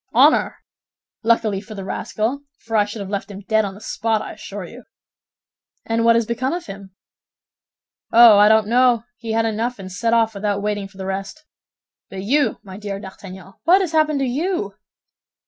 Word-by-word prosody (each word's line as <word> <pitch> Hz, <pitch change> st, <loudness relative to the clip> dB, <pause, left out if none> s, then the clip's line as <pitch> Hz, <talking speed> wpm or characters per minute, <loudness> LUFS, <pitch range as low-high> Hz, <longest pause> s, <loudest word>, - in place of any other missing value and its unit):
"Honor! -, -, +4 dB, 0.6 s
Luckily 220 Hz, -3 st, +1 dB
for 215 Hz, +1 st, -11 dB
the 195 Hz, -1 st, -7 dB
rascal, 220 Hz, +6 st, -2 dB, 0.2 s
for 225 Hz, -1 st, -5 dB
I 210 Hz, -1 st, +4 dB
should 210 Hz, +1 st, -7 dB
have 195 Hz, -, -6 dB
left 200 Hz, +1 st, -3 dB
him 200 Hz, 0 st, -9 dB
dead 220 Hz, +2 st, +1 dB
on 195 Hz, -2 st, -5 dB
the -, -, -12 dB
spot, 225 Hz, 0 st, -1 dB
I -, -, -7 dB
assure -, -, -8 dB
you." -, -, -12 dB, 1.0 s
"And 230 Hz, 0 st, 0 dB
what 230 Hz, 0 st, +5 dB
has 230 Hz, -1 st, +2 dB
became 240 Hz, +5 st, -2 dB
of 350 Hz, 0 st, -4 dB
him?" 195 Hz, -1 st, -10 dB, 1.2 s
"Oh, 230 Hz, -3 st, +8 dB
I 210 Hz, +1 st, +7 dB
don't 220 Hz, -1 st, +4 dB
know; 240 Hz, 0 st, +3 dB
he 225 Hz, -2 st, -5 dB
had 225 Hz, 0 st, +1 dB
enough, 225 Hz, +3 st, -2 dB
and 190 Hz, -2 st, -9 dB
set 230 Hz, +5 st, -1 dB
off 225 Hz, -1 st, +2 dB
without 200 Hz, 0 st, -2 dB
waiting 205 Hz, -1 st, -2 dB
for 195 Hz, 0 st, -20 dB
the 190 Hz, -, -6 dB
rest. 195 Hz, +11 st, -5 dB, 0.6 s
But 190 Hz, -1 st, -7 dB
you, 265 Hz, +2 st, +1 dB
my 190 Hz, -1 st, -10 dB
dear 200 Hz, -1 st, -5 dB
D'Artagnan, 190 Hz, -1 st, -11 dB
what 370 Hz, +4 st, +5 dB
has 360 Hz, -4 st, -2 dB
happened 310 Hz, -2 st, +2 dB
to -, -, +1 dB
you?" 265 Hz, -, -2 dB
220 Hz, 190 wpm, -21 LUFS, 200-235 Hz, 1.2 s, Oh